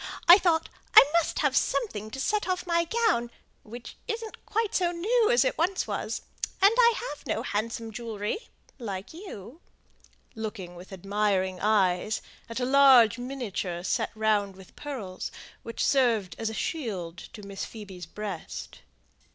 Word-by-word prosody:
I 350 Hz, +3 st, +10 dB
thought 335 Hz, -4 st, +2 dB, 0.3 s
I -, -, +12 dB
must 340 Hz, -1 st, +2 dB
have -, -, +2 dB
something 215 Hz, -, 0 dB
to 265 Hz, -, -7 dB
set 415 Hz, +10 st, 0 dB
off 365 Hz, -1 st, -1 dB
my 340 Hz, -1 st, +2 dB
gown, 400 Hz, -, +1 dB, 0.3 s
which 235 Hz, +2 st, -10 dB
isn't 450 Hz, -1 st, -6 dB
quite 445 Hz, -1 st, 0 dB
so 350 Hz, -2 st, +2 dB
new 435 Hz, +7 st, +2 dB
as 485 Hz, -, +4 dB
it -, -, -1 dB
once 365 Hz, +3 st, +1 dB
was; -, -, -3 dB, 0.4 s
and 395 Hz, +3 st, +6 dB
I 475 Hz, -1 st, +6 dB
have 295 Hz, -, -6 dB
no 220 Hz, -, -1 dB
handsome 225 Hz, +2 st, -3 dB
jewellery 225 Hz, -, -4 dB, 0.3 s
like 200 Hz, -2 st, -6 dB
you" 320 Hz, -, -10 dB, 0.7 s
looking 210 Hz, -5 st, -6 dB
with 180 Hz, +3 st, -12 dB
admiring 190 Hz, -1 st, 0 dB
eyes 205 Hz, 0 st, +2 dB, 0.3 s
at 230 Hz, -, -4 dB
a 250 Hz, -, 0 dB
large 255 Hz, -4 st, +6 dB
miniature 220 Hz, -9 st, -4 dB
set -, -, 0 dB
round 210 Hz, -3 st, +1 dB
with 190 Hz, -1 st, -15 dB
pearls, 240 Hz, -11 st, -6 dB, 0.3 s
which 230 Hz, -, -3 dB
served 230 Hz, -9 st, +2 dB
as 225 Hz, -1 st, -1 dB
a -, -, -6 dB
shield 190 Hz, -, -3 dB
to 210 Hz, -, -10 dB
Miss 200 Hz, -1 st, -6 dB
Phoebe's 195 Hz, -6 st, -8 dB
breast. 200 Hz, -2 st, -7 dB
230 Hz, 150 wpm, -27 LUFS, -, 0.7 s, I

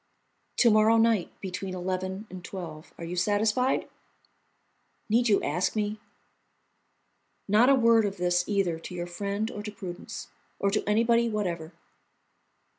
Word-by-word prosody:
"To 235 Hz, -, +6 dB
morrow 215 Hz, +1 st, +5 dB
night 225 Hz, -4 st, +3 dB
between 190 Hz, 0 st, -5 dB
eleven 185 Hz, +2 st, -3 dB
and 185 Hz, -1 st, -8 dB
twelve. 165 Hz, -5 st, -8 dB
Are -, -, -8 dB
you 170 Hz, +2 st, -4 dB
satisfied?" 210 Hz, +7 st, +1 dB, 1.2 s
"Need 235 Hz, +3 st, +3 dB
you 200 Hz, -, +3 dB
ask 175 Hz, +9 st, 0 dB
me?" 210 Hz, 0 st, -1 dB, 1.5 s
"Not 215 Hz, +6 st, +5 dB
a 275 Hz, -, +7 dB
word 230 Hz, -3 st, +4 dB
of 200 Hz, -1 st, -3 dB
this 175 Hz, 0 st, +2 dB
either 190 Hz, -5 st, +1 dB
to 180 Hz, -, -8 dB
your 175 Hz, 0 st, -3 dB
friend 200 Hz, +5 st, -3 dB
or 205 Hz, -, -6 dB
to 210 Hz, 0 st, -6 dB
Prudence, 180 Hz, -3 st, -8 dB, 0.3 s
or 200 Hz, -, +1 dB
to 210 Hz, -, 0 dB
anybody 230 Hz, +2 st, +3 dB
whatever." 175 Hz, -7 st, -3 dB
200 Hz, 140 wpm, -28 LUFS, 180-220 Hz, 1.5 s, a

